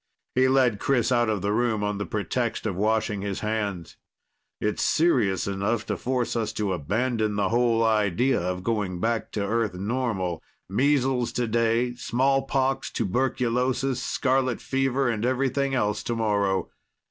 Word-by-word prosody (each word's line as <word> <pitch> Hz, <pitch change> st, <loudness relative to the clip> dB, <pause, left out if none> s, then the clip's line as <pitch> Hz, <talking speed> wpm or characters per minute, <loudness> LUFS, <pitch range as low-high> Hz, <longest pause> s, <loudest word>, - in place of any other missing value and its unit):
He 130 Hz, +1 st, +4 dB
led 130 Hz, -5 st, +3 dB
Chris 130 Hz, -3 st, +1 dB
out 120 Hz, -2 st, +3 dB
of 105 Hz, -3 st, -1 dB
the 100 Hz, -, +1 dB
room 110 Hz, -1 st, +1 dB
on 105 Hz, -1 st, -1 dB
the 100 Hz, -, -3 dB
pretext 110 Hz, +4 st, -2 dB
of 100 Hz, -4 st, -1 dB
washing 105 Hz, 0 st, 0 dB
his 100 Hz, -1 st, -3 dB
hands. 105 Hz, -5 st, -3 dB, 0.6 s
"It's 105 Hz, -, -1 dB
serious 120 Hz, -, +2 dB
enough 100 Hz, +3 st, -1 dB
to -, -, -2 dB
force 125 Hz, -2 st, -1 dB
us 110 Hz, -2 st, -1 dB
to 105 Hz, -3 st, -1 dB
abandon 110 Hz, -, -1 dB
the 100 Hz, -2 st, +1 dB
whole 115 Hz, -1 st, +2 dB
idea 110 Hz, +3 st, +2 dB
of 90 Hz, +1 st, -3 dB
going 105 Hz, -5 st, -1 dB
back 115 Hz, +3 st, -1 dB
to 100 Hz, -2 st, -1 dB
Earth 110 Hz, -2 st, 0 dB
normal. 100 Hz, -4 st, -2 dB, 0.3 s
Measles 130 Hz, +2 st, +1 dB
today, 120 Hz, +1 st, +1 dB
smallpox, 135 Hz, +1 st, 0 dB
tuberculosis, 125 Hz, +3 st, 0 dB
scarlet 130 Hz, -2 st, 0 dB
fever 135 Hz, 0 st, 0 dB
and 115 Hz, -2 st, -1 dB
everything 135 Hz, +2 st, 0 dB
else 105 Hz, -4 st, 0 dB
tomorrow. 105 Hz, -4 st, 0 dB
115 Hz, 145 wpm, -25 LUFS, 105-130 Hz, 0.6 s, He